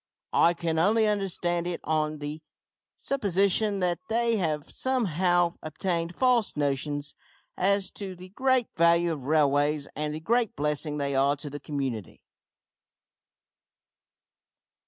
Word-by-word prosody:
I 170 +1 +4
can 165 -1 -1
only 215 +6 +3
understand 180 -4 -1
it 175 -1 -3
on 155 -1 0
the 150 +1 -6 0.6
supposition 200 -4 +1
that 175 -1 +1
they 230 0 +2
have 155 -6 -2
somehow 180 -8 +1
obtained 170 +2 -3
false 250 -8 +2
notions 145 0 -1 0.4
as 200 +1 +1
to 195 -2 -7
the 180 +1 -12
great 260 +4 +2
value 170 +1 +4
of 135 -4 -7
railways 145 -1 +2
and 150 +1 -2
the - - -4
great 230 +6 +1
blessing 150 +1 -1
they 140 -1 -1
are 135 +1 +3
to 145 0 -7
the 145 - -6
community. 130 - -4
170 Hz, 125 wpm, -27 LUFS, 150-200 Hz, 0.6 s, I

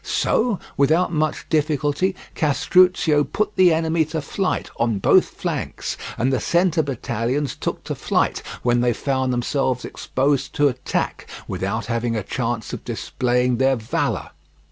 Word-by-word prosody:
So, 230 -3 +1 0.2
without 160 +6 +3
much 155 -1 -1
difficulty, 155 +4 +1 0.2
Castruccio 160 0 +3
put 210 +7 -2
the 185 -2 +6
enemy 160 0 +2
to 160 +1 -3
flight 190 +5 -2
on 115 -3 +1
both 95 - +5
flanks, - - -4 0.2
and 130 +4 +1
the 130 - +2
centre 170 -1 +2
battalions 130 0 -2
took - - -4
to - - -4
flight - - 0 0.2
when 120 0 +3
they 120 -1 +2
found 130 +1 -1
themselves 125 +1 0
exposed 135 +1 -1
to 145 -2 +4
attack, 125 -1 -3 0.2
without 105 +4 -2
having 115 0 -1
a 105 - -2
chance 120 +1 -3
of - - -6
displaying 125 0 0
their 135 +1 +3
valour. 110 -2 -2
140 Hz, 145 wpm, -22 LUFS, 120-160 Hz, 0.2 s, the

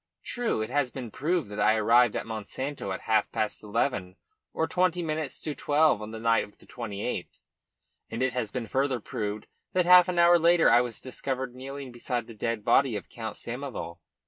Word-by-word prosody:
True, 235 - -1
it 110 - -6
has 140 -2 +1
been 125 -3 -7
proved 160 - -1
that 105 - -5
I 105 +1 +4
arrived 115 +2 +4
at - - -2
Monsanto 110 +2 -5
at 95 - -4
half 110 -2 +1
past 110 - -2
eleven 105 -3 -1 0.4
or 160 - -1
twenty 180 -1 +1
minutes 155 -3 -3
to 150 - -3
twelve 145 -6 +2
on 105 - -6
the 110 0 -7
night 115 0 +3
of 105 - -13
the - - -18
28th, 115 -5 -5 0.7
and 115 +3 -2
it 130 - +1
has 115 -4 -2
been 125 -3 -3
further 130 +1 0
proved 105 -3 -4 0.3
that 180 -1 +2
half 180 0 +8
an 180 - -2
hour 170 0 +6
later 170 -2 +5
I 120 +1 +6
was 120 -2 -5
discovered 130 0 -4
kneeling 135 +1 -7
beside 120 0 -3
the 115 - -11
dead 110 0 -3
body 125 0 +4
of 100 - -6
Count 110 -3 -6
Samoval. 120 -9 -6
125 Hz, 200 wpm, -28 LUFS, 110-145 Hz, 0.7 s, half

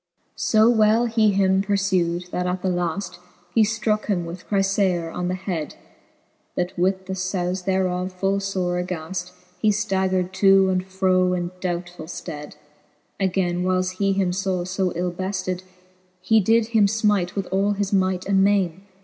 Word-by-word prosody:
XXIII. - - -47
So 220 +1 +5
well 220 +1 +4
he 225 -2 +3
him 190 -1 +3
purfew'd, 185 -3 0
that 180 0 -1
at 180 0 -2
the 190 - +1
lafl:. 175 +1 -2 0.3
He 225 - +4
ftroke 215 0 +1
him 180 -5 -1
with 170 +2 -8
Chryfaor 195 -4 +1
on 180 - -2
the 180 - -1
hed, 180 -5 -4 0.8
That 180 +1 -2
with 190 +1 0
the 190 - -4
fbule 185 -1 -2
thereof 185 -1 0
full 195 +2 0
fore 185 -3 -1
aghaft:^ 180 +1 -5 0.3
He 215 - +3
ftaggered 190 -3 0
to 195 0 +5
and 185 -1 0
fro 185 -1 +1
in 175 -1 -3
doubtfull 175 -2 -4
fted, 150 -3 -7 0.6
Againe 180 -2 0
whiles 185 0 +1
he 195 -1 +2
him 190 -2 +1
faw 185 -1 -1
fb 185 0 -1
ill 180 +1 -1
befted, 185 0 -3 0.6
He 220 +4 +3
did 225 +2 +2
him 220 -3 +4
finite 205 -4 +1
with 195 -2 -2
all 200 +2 +2
his 205 0 -2
might 185 -1 +1
and 195 -1 +3
maine. 190 -3 +1
190 Hz, 165 wpm, -23 LUFS, 180-200 Hz, 0.8 s, So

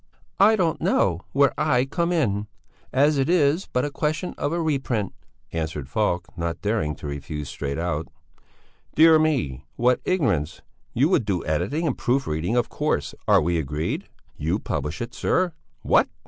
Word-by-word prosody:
"I 215 +3 +7
don't 175 -6 0
know 90 -3 +2
where 140 0 +4
I 130 -4 +3
come 170 +5 -1
in, 105 - 0 0.4
as 145 +2 +3
it 135 +3 +1
is 165 +1 +3
but 125 +2 +1
a 145 - -3
question 155 +5 -2
of 145 - -2
a 170 - -1
reprint," 135 - -1 0.4
answered 80 -4 -3
Falk, 90 +3 -1
not 85 +1 -3
daring 100 -8 0
to - - -11
refuse 75 0 -5
straight 70 0 -4
out. 80 -2 -2 0.9
"Dear 160 0 +7
me, 125 - 0
what 125 +1 +2
ignorance! 100 - 0 0.3
You 135 +5 +4
would 180 - +3
do 95 -4 0
the - - -6
editing 145 - 0
and 140 - 0
proof 135 +3 0
reading, 80 +7 -1
of 120 -1 +2
course. - - -1
Are - - +6
we 85 +1 +1
agreed? 75 +1 -3 0.3
You 80 +6 0
publish 75 -5 -3
it, 120 - -8
sir! 180 -2 +1 0.3
What? - - +4
120 Hz, 170 wpm, -24 LUFS, -, 0.9 s, I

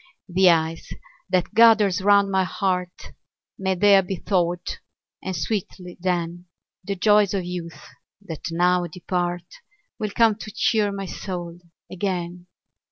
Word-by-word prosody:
The 185 +1 +4
ice 165 -1 0 0.4
that 185 -2 0
gathers 215 -4 +5
round 200 0 +4
my 190 -1 +2
heart 180 -1 -3 0.5
May 190 -1 0
there 200 +1 +5
be 190 +1 -4
thawed; 175 -1 -1 0.4
and 190 -1 -4
sweetly, 180 0 -4
then, 175 -1 -2 0.4
The 200 +2 -3
joys 205 0 +3
of 185 -2 -2
youth, 175 -2 -7 0.4
that 170 -6 -9
now 175 +1 +2
depart, 175 +1 -3 0.5
Will 215 - -2
come 225 +1 +3
to 215 - -8
cheer 210 -1 +1
my 195 0 -5
soul 175 -2 -6 0.3
again. 180 -2 -4
185 Hz, 130 wpm, -23 LUFS, 175-200 Hz, 0.5 s, gathers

